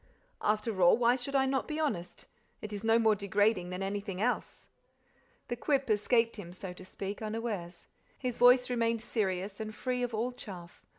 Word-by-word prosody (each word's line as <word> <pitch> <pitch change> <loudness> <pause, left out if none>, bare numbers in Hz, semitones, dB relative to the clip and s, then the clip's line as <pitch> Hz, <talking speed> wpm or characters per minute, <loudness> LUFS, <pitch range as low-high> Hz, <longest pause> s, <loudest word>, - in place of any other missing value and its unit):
After 210 -2 0
all, 175 +4 +7
why 240 0 +4
should 265 +2 -5
I 265 -1 +4
not 265 0 0
be 305 0 -3
honest? 180 - -3 0.3
It 215 0 -7
is 205 +1 -5
no 225 0 +4
more 220 -2 +4
degrading 200 -2 +1
than 180 +1 -4
anything 200 -1 -3
else!" 245 +4 -2 0.8
The 240 - -2
quip 270 -1 0
escaped 230 +2 +2
him, 175 -4 -8
so 185 0 -7
to 185 - -12
speak, 195 +2 -6
unawares. 215 -6 -4 0.3
His 250 -3 -3
voice 250 +1 +7
remained 230 -2 0
serious 195 -3 -2
and 215 0 -5
free 250 +2 -2
of 245 -1 -1
all 235 +3 -1
chaff. 180 -8 -10
220 Hz, 180 wpm, -31 LUFS, 195-245 Hz, 0.8 s, all